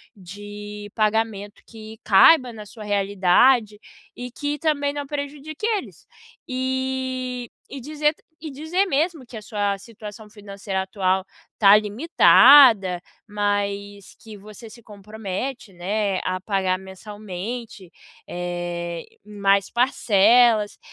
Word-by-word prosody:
de 205 Hz, +2 st, -10 dB
pagamento 215 Hz, -2 st, -1 dB
que 220 Hz, -1 st, -12 dB
caiba 245 Hz, +5 st, +5 dB
na 215 Hz, -2 st, -10 dB
sua 215 Hz, +1 st, -12 dB
realidade 205 Hz, +3 st, +2 dB, 0.4 s
e 250 Hz, 0 st, -7 dB
que 290 Hz, +3 st, -4 dB
também 285 Hz, -2 st, 0 dB
não 290 Hz, 0 st, -5 dB
prejudique 290 Hz, +4 st, -6 dB
eles. 440 Hz, -3 st, -4 dB, 0.4 s
Eh, 260 Hz, -1 st, -3 dB, 0.2 s
e 275 Hz, -, -7 dB
dizer 300 Hz, +3 st, -1 dB, 0.3 s
e 315 Hz, -, -6 dB
dizer 315 Hz, +8 st, -1 dB
mesmo 315 Hz, -2 st, -1 dB
que 240 Hz, -, -13 dB
a -, -, -8 dB
sua 205 Hz, -1 st, -2 dB
situação 210 Hz, 0 st, -11 dB
financeira 200 Hz, -2 st, -6 dB
atual 190 Hz, -1 st, -1 dB, 0.3 s
tá 200 Hz, -1 st, +7 dB
limitada, 215 Hz, -, +5 dB, 0.3 s
mas 205 Hz, -1 st, -3 dB
que 220 Hz, -3 st, -12 dB
você 215 Hz, +3 st, -13 dB
se 235 Hz, -, -15 dB
compromete, 210 Hz, +2 st, -7 dB
né, 195 Hz, +2 st, -2 dB
a 185 Hz, 0 st, -2 dB
pagar 190 Hz, -1 st, -1 dB
mensalmente, 205 Hz, +1 st, -8 dB, 0.4 s
eh, 175 Hz, -1 st, -5 dB, 0.2 s
mais 200 Hz, -1 st, +1 dB
parcelas, 230 Hz, -2 st, +3 dB
210 Hz, 110 wpm, -22 LUFS, 200-255 Hz, 0.4 s, tá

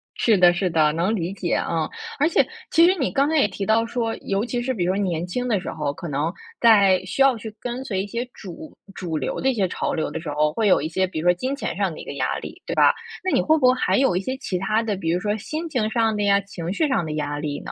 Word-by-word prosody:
是 220 Hz, -4 st, +3 dB
的 175 Hz, -1 st, +6 dB
是 180 Hz, +1 st, 0 dB
的， 155 Hz, -2 st, +3 dB
能 180 Hz, +7 st, 0 dB
理 175 Hz, 0 st, -3 dB
解。 180 Hz, -3 st, -1 dB
嗯， 165 Hz, -2 st, -1 dB, 0.3 s
而 300 Hz, +4 st, +3 dB
且 -, -, +3 dB, 0.2 s
其 330 Hz, +1 st, +6 dB
实 365 Hz, -, +5 dB
你 260 Hz, -, 0 dB
刚 275 Hz, +1 st, +2 dB
才 315 Hz, -, 0 dB
也 275 Hz, -, +4 dB
提 200 Hz, -1 st, -5 dB
到 220 Hz, +1 st, +3 dB
说， 230 Hz, -1 st, -2 dB
尤 200 Hz, +3 st, -2 dB
其 245 Hz, 0 st, -2 dB
是 260 Hz, +2 st, -1 dB
比 185 Hz, -8 st, -1 dB
如 185 Hz, -, +1 dB
说 205 Hz, -, 0 dB
年 170 Hz, -2 st, -1 dB
轻 245 Hz, +8 st, -3 dB
的 215 Hz, -6 st, +1 dB
时 -, -, -5 dB
候， 150 Hz, -2 st, -2 dB
可 165 Hz, +4 st, -8 dB
能 150 Hz, +3 st, -1 dB, 0.3 s
在 200 Hz, -5 st, +5 dB
需 195 Hz, +8 st, -3 dB
要 270 Hz, -3 st, +4 dB
去 220 Hz, -1 st, -8 dB
跟 245 Hz, +1 st, -4 dB
随 195 Hz, -7 st, -2 dB
一 -, -, -7 dB
些 235 Hz, +4 st, -3 dB
主 220 Hz, -, -11 dB, 0.2 s
主 165 Hz, -4 st, -4 dB
流 130 Hz, -, -3 dB
的 265 Hz, -, +2 dB
一 260 Hz, -, 0 dB
些 195 Hz, -4 st, +1 dB
潮 -, -, -2 dB
流 160 Hz, -, -2 dB
的 -, -, -5 dB
时 160 Hz, -, -6 dB
候， 150 Hz, +1 st, +1 dB
会 220 Hz, +1 st, +1 dB
有 185 Hz, -, +5 dB
一 155 Hz, -, -2 dB
些 185 Hz, +3 st, 0 dB
比 180 Hz, -, -5 dB
如 165 Hz, -, -1 dB
说 175 Hz, -, +6 dB
金 255 Hz, +10 st, -3 dB
钱 -, -, -4 dB
上 -, -, 0 dB
的 -, -, -9 dB
一 -, -, -8 dB
个 -, -, -6 dB
压 -, -, -1 dB
力， -, -, -9 dB
对 -, -, -2 dB
吧？ -, -, +5 dB, 0.3 s
那 375 Hz, -, 0 dB
你 -, -, +4 dB
会 315 Hz, 0 st, +3 dB
不 260 Hz, -, +2 dB
会 255 Hz, -, +6 dB
还 255 Hz, -, +1 dB
有 265 Hz, -9 st, +3 dB
一 185 Hz, -, +1 dB
些 260 Hz, +6 st, -4 dB
其 185 Hz, -9 st, -3 dB
他 215 Hz, +4 st, +1 dB
的， 215 Hz, -3 st, -1 dB
比 165 Hz, -3 st, -3 dB
如 175 Hz, -, +1 dB
说 210 Hz, +3 st, -1 dB
心 310 Hz, +9 st, -5 dB
情 245 Hz, -8 st, -1 dB
上 225 Hz, -1 st, +1 dB
的 205 Hz, -, -2 dB
呀， 200 Hz, 0 st, +4 dB
情 180 Hz, -3 st, -6 dB
绪 300 Hz, +9 st, +1 dB
上 260 Hz, -10 st, +1 dB
的 155 Hz, -1 st, -4 dB
压 145 Hz, -1 st, -3 dB
力 145 Hz, -1 st, -3 dB
呢？ -, -, -7 dB
200 Hz, 320 characters per minute, -23 LUFS, 175-245 Hz, 0.3 s, 的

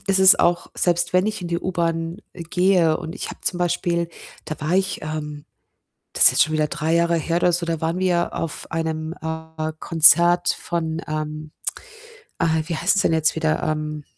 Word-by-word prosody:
ist 195 Hz, -1 st, +3 dB
es 190 Hz, 0 st, +7 dB
auch 175 Hz, 0 st, +1 dB
selbst 175 Hz, -1 st, +1 dB
wenn 185 Hz, +1 st, +3 dB
ich 215 Hz, -1 st, -3 dB
in 180 Hz, -, -6 dB
die 170 Hz, 0 st, -2 dB
U-Bahn 170 Hz, -2 st, -2 dB, 0.2 s
gehe 175 Hz, -1 st, +1 dB
und 160 Hz, -, -8 dB
ich -, -, -5 dB
habe -, -, -12 dB
zum 180 Hz, -, 0 dB
Beispiel, 170 Hz, -1 st, -1 dB, 0.4 s
da 155 Hz, -, -7 dB
war 155 Hz, +4 st, -1 dB
ich 190 Hz, +1 st, 0 dB
ähm, 150 Hz, -1 st, -6 dB, 0.7 s
das -, -, +6 dB
ist -, -, +10 dB
jetzt -, -, +4 dB
schon 155 Hz, -, -4 dB
wieder 155 Hz, -1 st, +1 dB
3 160 Hz, +2 st, -2 dB
Jahre 170 Hz, 0 st, +2 dB
her 165 Hz, +1 st, -2 dB
oder 175 Hz, 0 st, +2 dB
so, 170 Hz, 0 st, 0 dB
da 165 Hz, -2 st, -3 dB
waren 165 Hz, +2 st, -2 dB
wir 180 Hz, -2 st, 0 dB
auf 165 Hz, -2 st, -5 dB
einem, 160 Hz, -1 st, -3 dB
äh, 160 Hz, 0 st, -5 dB
Konzert 170 Hz, +2 st, +5 dB
von, 160 Hz, -2 st, -3 dB
ähm 155 Hz, 0 st, -5 dB, 0.9 s
ah, 165 Hz, -, 0 dB, 0.2 s
wie 170 Hz, -, -3 dB
heißt's 200 Hz, +5 st, +2 dB
denn -, -, +1 dB
jetzt 160 Hz, -1 st, +3 dB
wieder? 160 Hz, -1 st, -1 dB
Ähm, 155 Hz, -1 st, -3 dB
165 Hz, 190 wpm, -21 LUFS, 155-175 Hz, 0.9 s, ist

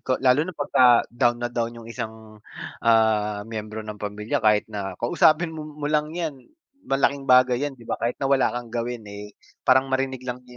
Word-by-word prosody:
ko 130 Hz, -, 0 dB
lalo 130 Hz, +3 st, +5 dB
na 185 Hz, -, -7 dB
'pagka 130 Hz, -4 st, +4 dB
down 120 Hz, 0 st, +2 dB
na 120 Hz, -, -1 dB
down 115 Hz, -1 st, -2 dB
yung 115 Hz, -, -11 dB
isang, 110 Hz, -1 st, -8 dB, 0.4 s
ah, 110 Hz, -2 st, +2 dB
miyembro 110 Hz, -1 st, -6 dB
ng 105 Hz, -1 st, -8 dB
pamilya 105 Hz, +6 st, -3 dB
kahit 105 Hz, -2 st, +3 dB
na 95 Hz, -3 st, -5 dB
kausapin 155 Hz, +7 st, +2 dB
mo 150 Hz, -2 st, -8 dB
lang 150 Hz, 0 st, +1 dB
yan, 160 Hz, -6 st, -4 dB, 0.4 s
malaking 135 Hz, 0 st, 0 dB
bagay 125 Hz, 0 st, +5 dB
yan, 135 Hz, -, -13 dB
'di 120 Hz, -, -15 dB
ba, -, -, -1 dB
kahit 120 Hz, +1 st, -1 dB
na -, -, -1 dB
wala 135 Hz, -1 st, +4 dB
kang 120 Hz, -1 st, -6 dB
gawin, 120 Hz, -1 st, -4 dB
eh, 105 Hz, 0 st, -10 dB, 0.3 s
parang 130 Hz, 0 st, +4 dB
marinig 130 Hz, -1 st, -1 dB
lang 125 Hz, 0 st, -5 dB
nya 125 Hz, -, -14 dB
120 Hz, 195 wpm, -24 LUFS, 110-135 Hz, 0.4 s, lalo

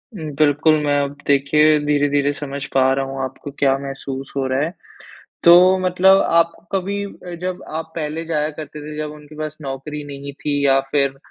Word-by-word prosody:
बिल्कुल, 155 Hz, -1 st, +2 dB
मैं 145 Hz, 0 st, +2 dB
अब 140 Hz, 0 st, -5 dB
देखिए 150 Hz, +2 st, +4 dB
धीरे-धीरे 145 Hz, -1 st, +2 dB
समझ 140 Hz, -1 st, -6 dB
पा 130 Hz, 0 st, +4 dB
रहा 135 Hz, 0 st, -1 dB
हूँ, 135 Hz, 0 st, -5 dB
आपको 135 Hz, +2 st, -6 dB
क्या 135 Hz, -1 st, +3 dB
महसूस 135 Hz, -1 st, -6 dB
हो 135 Hz, -, 0 dB
रहा 130 Hz, +1 st, 0 dB
है। 165 Hz, +4 st, -3 dB, 0.7 s
तो 180 Hz, +2 st, +7 dB
मतलब 185 Hz, +1 st, +4 dB, 0.2 s
आप 170 Hz, 0 st, +4 dB, 0.2 s
कभी 200 Hz, +1 st, -1 dB
अ, 180 Hz, -3 st, -10 dB
जब 185 Hz, 0 st, -4 dB
आप 160 Hz, +1 st, -5 dB
पहले 160 Hz, 0 st, -3 dB
जाया 155 Hz, -2 st, -1 dB
करते 150 Hz, -1 st, -8 dB
थे 150 Hz, +1 st, -8 dB
जब 150 Hz, 0 st, -4 dB
उनके 150 Hz, 0 st, -13 dB
पास 155 Hz, 0 st, -5 dB
नौकरी 145 Hz, +2 st, -6 dB
नहीं 140 Hz, 0 st, -8 dB
थी 145 Hz, -1 st, 0 dB
या 135 Hz, -1 st, +5 dB
फिर, 140 Hz, -2 st, +1 dB
150 Hz, 180 wpm, -20 LUFS, 140-160 Hz, 0.7 s, तो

